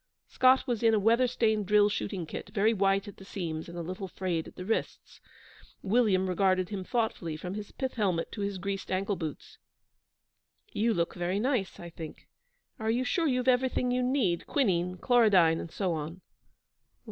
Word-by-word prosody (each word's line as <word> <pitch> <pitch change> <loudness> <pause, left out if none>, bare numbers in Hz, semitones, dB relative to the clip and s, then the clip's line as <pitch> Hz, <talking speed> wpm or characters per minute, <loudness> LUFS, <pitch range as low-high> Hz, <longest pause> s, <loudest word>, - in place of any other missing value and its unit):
Scott 260 +1 +4
was 240 -4 -2
in 225 -1 +4
a - - +3
weather 230 +5 +4
stained 220 -4 +1
drill 210 0 +5
shooting 195 -3 -3
kit, 160 - -7
very 210 +2 +2
white 195 -1 +1
at 205 - -10
the - - -12
seams 170 -5 -5
and 170 - -8
a 170 - -3
little 185 +3 -5
frayed 175 -3 -3
at - - -13
the 180 - -7
wrists. 225 - -3 0.6
William 200 -3 +2
regarded 185 -1 +1
him 195 -3 -4
thoughtfully, 185 -8 -2
from 180 +3 -6
his 205 0 -6
pith 265 -1 -3
helmet 185 -7 -1
to 210 - -6
his 200 -1 -2
greased 195 +1 -4
ankle 195 +2 0
boots. 160 -4 -7 1.1
'You 230 +3 +1
look 170 -1 0
very 180 +2 -1
nice, 240 -5 -1
I 170 0 -8
think. 160 -2 -9 0.5
Are 220 0 -2
you 240 +3 +1
sure 330 +5 +1
you've 255 -2 0
everything 250 0 +2
you'll 250 0 +1
need 205 -11 0
quinine, 180 - +1
chlorodyne, 190 -8 +4
and - - -6
so 185 0 -1
on?' 160 +3 -5
200 Hz, 180 wpm, -29 LUFS, 180-230 Hz, 1.1 s, drill